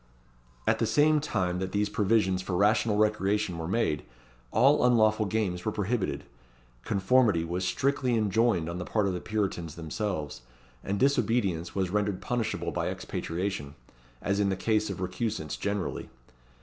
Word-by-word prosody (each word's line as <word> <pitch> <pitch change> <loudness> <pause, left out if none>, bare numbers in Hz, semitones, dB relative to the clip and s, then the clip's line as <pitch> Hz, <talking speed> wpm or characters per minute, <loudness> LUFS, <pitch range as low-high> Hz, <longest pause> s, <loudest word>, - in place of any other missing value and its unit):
At - - +2
the 115 - +1
same 150 +6 +4
time 90 -11 -1
that 95 0 -4
these 105 0 +1
provisions 100 -3 +1
for 95 -1 -3
rational 105 +2 +3
recreation 105 -3 +1
were 80 - -4
made, 90 -7 0 0.5
all 140 - +4
unlawful 110 -3 +4
games 95 -4 -1
were 110 - -1
prohibited. 105 0 -2 0.6
Conformity 100 - +2
was 90 +2 -2
strictly 130 +4 +1
enjoined 105 -4 +2
on 85 +1 -4
the - - -3
part 105 +2 0
of 95 - 0
the 90 - -4
Puritans 95 -7 -2
themselves; 80 - -4 0.4
and 100 +1 -2
disobedience 115 -10 +1
was 95 -2 0
rendered 105 -2 0
punishable 120 -2 -2
by - - -2
expatriation, 85 -5 -4 0.5
as 100 +1 0
in 100 -1 +2
the 95 - 0
case 110 +2 0
of 95 -2 -5
recusants 95 -2 -3
generally. 100 -1 -3
100 Hz, 150 wpm, -28 LUFS, 90-110 Hz, 0.6 s, same